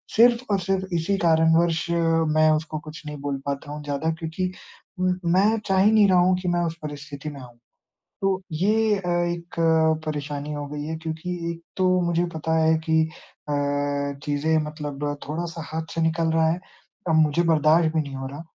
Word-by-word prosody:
सिर्फ़ 235 +2 +5
और 200 - +2
सिर्फ़ 190 +1 -1
इसी 170 +4 0
कारणवश 160 0 +3 0.5
मैं 155 0 +5
उसको 155 0 -4
कुछ 155 0 -10
नहीं 150 0 -6
बोल 140 -1 -2
पाता 140 +1 -4
हूँ 150 0 -6
ज़्यादा 145 +2 -1
क्योंकि 165 +3 -3 0.5
उ 185 0 +2 0.2
मैं 210 +4 +3
चाह 190 -1 +2
ही 210 - +5
नहीं 215 -2 +6
रहा 185 -1 +5
हूँ 180 +1 +4
कि 180 - -4
मैं 175 0 +1
उस 165 -1 -3
परिस्थिति 145 0 -6
में 145 -2 -9
आऊँ। 120 -2 -13 0.7
तो 195 -1 +1
ये 210 +6 +2
अ, 185 -2 -5
एक 175 0 -2 0.5
परेशानी 145 -1 -4
हो 145 -1 -4
गई 145 0 -5
है 160 +1 -3
क्योंकि 160 +2 -5 0.2
एक 170 0 -11
तो 185 -1 +2 0.2
मुझे 170 0 +1
पता 160 +1 -1
है 160 0 +4
कि 160 0 +4 0.5
अ, - - -1 0.7
चीज़ें 150 +2 +1
मतलब 150 -1 -5 0.2
थोड़ा-सा 165 +1 -4
हाथ 160 0 -4
से 165 - -1
निकल 160 0 +1
रहा 160 0 +3
है, 170 +2 -2 0.5
अब 165 - +3
मुझे 155 +1 +3
बर्दाश्त 160 0 +3
भी 160 - +3
नहीं 140 -2 -8
हो 135 0 -5
रहा। 140 +4 -7
160 Hz, 190 wpm, -24 LUFS, 150-175 Hz, 0.7 s, नहीं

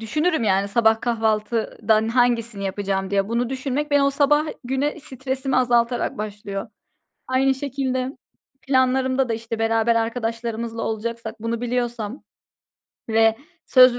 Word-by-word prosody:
düşünürüm, 305 +5 0
yani, 195 -1 +2
sabah 220 +1 +3
kahvaltıdan 220 -1 +1
hangisini 235 -3 +1
yapacağım 195 0 -2
diye. 195 0 +1
Bunu 235 +1 0
düşünmek, 270 +3 -2
beni 285 -1 +4
o 275 - +3
sabah 295 +2 +3 0.2
güne 270 +5 -1
stresimi 265 0 -3
azaltarak 240 -2 +2
başlıyor. 205 -1 -5 0.6
Aynı 265 +1 +2
şekilde, 265 -1 -2 0.5
planlarımda 260 0 +2
da, 230 - 0
işte, 230 0 -5
beraber 225 +1 +2
arkadaşlarımızla 230 0 -2
olacaksak 225 +1 -3
bunu 230 +1 -2
biliyorsam 240 -1 -2 0.9
ve 225 0 +4 0.3
söz 255 -1 +7
235 Hz, 120 wpm, -23 LUFS, 225-260 Hz, 0.9 s, söz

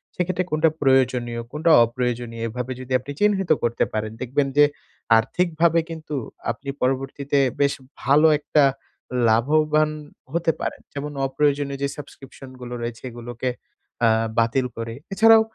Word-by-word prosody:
সেক্ষেত্রে 180 0 -1
কোনটা 155 +1 +3
প্রয়োজনীয় 125 -3 +2
কোনটা 160 +3 +2
অপ্রয়োজনীয় 120 -1 -3
এভাবে 125 +3 -5
যদি 130 0 -11
আপনি 135 +3 -8
চিহ্নিত 200 -4 +2
করতে 120 0 +1
পারেন, 110 0 -2
দেখবেন 135 +3 0
যে 145 - +8 0.5
আর্থিকভাবে 170 +5 +2
কিন্তু 155 -2 -6 0.4
আপনি 140 +4 -8
পরবর্তীতে 135 +2 0 0.2
বেশ 140 0 +3 0.3
ভালো 150 +3 +5
একটা 150 0 +2 0.7
লাভবান 155 +6 +3 0.4
হতে 170 -1 +2
পারেন। - - -4
যেমন 145 +1 -5 0.2
অপ্রয়োজনীয় 140 0 0
যে - - +2
সাবস্ক্রিপশনগুলো 130 -3 -10
রয়েছে, 115 0 -5
এগুলোকে 120 +1 -5 0.6
আ - - +6 0.3
বাতিল 115 +3 +2
করে। 115 0 -4 0.2
এছাড়াও 225 +3 +7
135 Hz, 125 wpm, -23 LUFS, 120-155 Hz, 0.7 s, যে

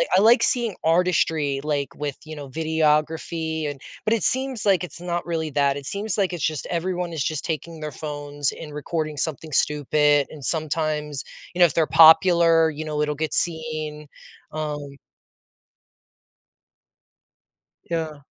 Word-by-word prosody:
I - - +6
like 235 +4 +6
seeing 235 -6 +1
artistry, 160 -4 +2
like 145 -2 -1
with, 145 -2 -4
you 155 0 -8
know, 140 -2 -8
videography 160 +1 0
and 140 -2 -8 0.2
but 220 - +3
it 220 - 0
seems 260 -4 -1
like 195 -3 +3
it's 175 -1 -8
not 175 -1 -3
really 160 -2 -2
that. 140 -1 +2
It 140 - -8
seems 205 +3 -3
like 195 -3 +1
it's 170 -5 -4
just 155 -3 -1
everyone 180 0 -2
is 150 -4 -1
just 155 0 -2
taking 165 0 -4
their 155 0 -5
phones 145 -1 -3
and 150 -2 -9
recording 155 0 -3
something 155 +1 -3
stupid. 145 0 +2
And 150 -3 -11
sometimes, 155 -2 -2 0.3
you 180 - -6
know, 175 - +9
if 165 - +1
they're 160 -2 +2
popular, 165 0 +6
you 155 0 -5
know, 150 -1 -2
it'll 150 0 0
get 155 +1 -3
seen. 155 -2 -2 0.4
Um 145 -2 -5 2.9
Yeah. 160 -4 -3
155 Hz, 155 wpm, -23 LUFS, 150-170 Hz, 2.9 s, know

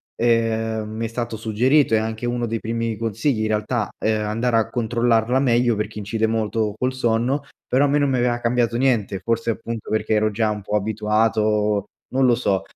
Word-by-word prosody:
ehm, 115 -2 0
mi 110 +1 -4
è - - -1
stato 115 0 -4
suggerito 115 +5 +2
e - - +4
è - - +2
anche 110 +2 -3
uno 120 0 -1
dei 115 0 -2
primi 115 0 -2
consigli 115 +2 -1
in 110 - 0
realtà, 110 +1 -1
ehm, 110 0 0
andare 115 +2 +1
a 110 - +1
controllarla 120 +1 +1
meglio 120 -3 +2
perché 105 0 -4
incide 110 +2 -1
molto 110 -1 -1
col 130 +2 -1
sonno, 125 +3 0 0.3
però 135 +3 +3
a - - +2
me 145 +1 +2
non 145 -2 +2
mi 130 - +1
aveva 120 -1 +1
cambiato 120 -1 +1
niente, 115 -7 +1
forse 115 +2 -1
appunto 115 0 -6
perché 110 0 0
ero 110 0 +2
già 110 +1 0
un 105 -1 -4
po’ 105 +2 -3
abituato, 105 0 +1 0.3
non 135 0 +3
lo 120 - +4
so, 100 -5 0
115 Hz, 200 wpm, -22 LUFS, 110-120 Hz, 0.3 s, e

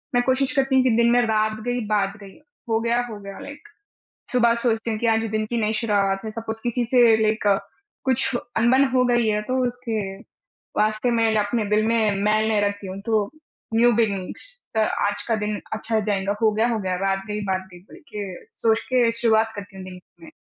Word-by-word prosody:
मैं 245 - +3
कोशिश 260 +1 +1
करती 270 0 +2
हूँ 260 - +5
कि 255 - +3
दिन 235 0 +4
में 245 0 +4
रात 215 -1 0
गई, 245 0 0
बात 200 -2 +1
गई, 195 -1 -13 0.3
हो 225 0 +2
गया, 235 +1 +1
हो 210 -2 -7
गया 200 -1 -9
लाइक 290 +8 -10 0.7
सुबह 235 -1 +4
सोचती 225 -1 0
हूँ 215 - -3
कि 235 - 0
आज 225 0 +3
दिन 215 0 0
की 235 +2 -3
नई 215 0 0
शुरुआत 200 -3 +1 0.2
सपोज़ 225 0 -6
किसी 240 0 0
से 245 -2 +6 0.2
लाइक 215 0 +1 0.6
कुछ 260 -1 +1 0.2
अनबन 255 +4 +4
हो 250 -1 +4
गई 240 -2 +2
है, 210 0 +1
तो 255 +4 -2
उसके 240 -3 -3 0.8
वास्ते 215 +3 +1
मैं 225 -2 +2
अपने 210 +2 0
दिल 210 +1 +3
में 220 -3 +2
मैल 215 +1 +2
नहीं 215 -2 +2
रखती 205 -1 -2
हूँ 190 +1 -6
तो 215 -3 +1 0.5
न्यू 240 +1 +5
बिगनिंग्स 200 -5 -1 0.3
च - - +4 0.3
आज 205 - -3
का 225 - +2
दिन 210 0 -2 0.2
अच्छा 220 0 -1
जाएँगा, 200 -1 -1
हो 220 - +4
गया, 220 +2 +1
हो 225 - 0
गया 185 -2 -2
रात 195 +1 -1
गई, 210 0 -3
बात 190 -1 -2
गई 175 - -12
बोल 190 - -16
के 200 -4 -7
सोच 225 -1 +2
के 245 -3 +3
शुरुआत 225 -1 +3
करती 200 -1 -9
हूँ 190 - -8
दिन 185 -1 -9 0.2
में। 325 - -11
220 Hz, 210 wpm, -23 LUFS, 205-235 Hz, 0.8 s, से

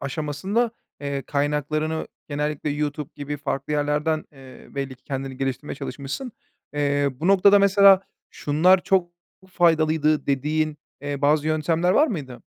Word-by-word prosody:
aşamasında 155 - -1 0.6
kaynaklarını 150 +2 -1 0.2
genellikle 150 0 -2
YouTube 150 +1 -3
gibi 145 +1 -5
farklı 140 0 -3
yerlerden, 150 +2 0
eee, 135 -2 -14
belli 135 -1 -4
ki - - -41
kendini 135 -2 -5
geliştirmeye 135 +2 -3
çalışmışsın. 145 - -6 0.4
Eee, 145 -1 +1
bu 135 +6 -5
noktada 195 +1 +6
mesela 200 -1 +6 0.3
şunlar 180 +6 +3
çok 185 -3 +2 0.4
faydalıydı 155 -3 +2
dediğin, 150 +2 0 0.2
eee, 145 0 -4
bazı 150 +1 +3
yöntemler 160 +3 +1
var 295 +11 +5
mıydı? 140 - -6
150 Hz, 125 wpm, -23 LUFS, 145-165 Hz, 0.6 s, noktada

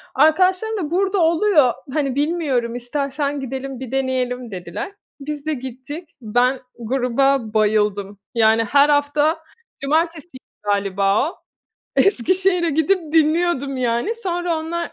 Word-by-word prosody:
Arkadaşlarım 370 +9 +3
da: 325 -6 -3
"Burada 385 +2 +1
oluyor, 325 - +4 0.2
hani, 280 -4 0
bilmiyorum, 285 -6 0
istersen 280 +3 -2
gidelim, 265 0 -5
bir 260 -2 -7
deneyelim." 255 -2 -1
dediler. 180 - -6 0.3
Biz 295 +1 -6
de 315 - 0
gittik. 265 +5 -7
Ben 245 +4 +1 0.2
gruba 250 0 +1
bayıldım. 210 -2 +1 0.2
Yani, 225 0 +4
her 280 +6 +4
hafta 295 +2 +2 0.4
cumartesiydi 315 0 -1 0.2
galiba 200 +4 +1
o. - - -18 0.6
Eskişehir'e 365 - +2
gidip 320 +1 +1
dinliyordum, 310 -3 +2
yani, 245 - 0
sonra 350 -6 -2
onlar 335 +2 -4
280 Hz, 115 wpm, -20 LUFS, 245-330 Hz, 0.6 s, oluyor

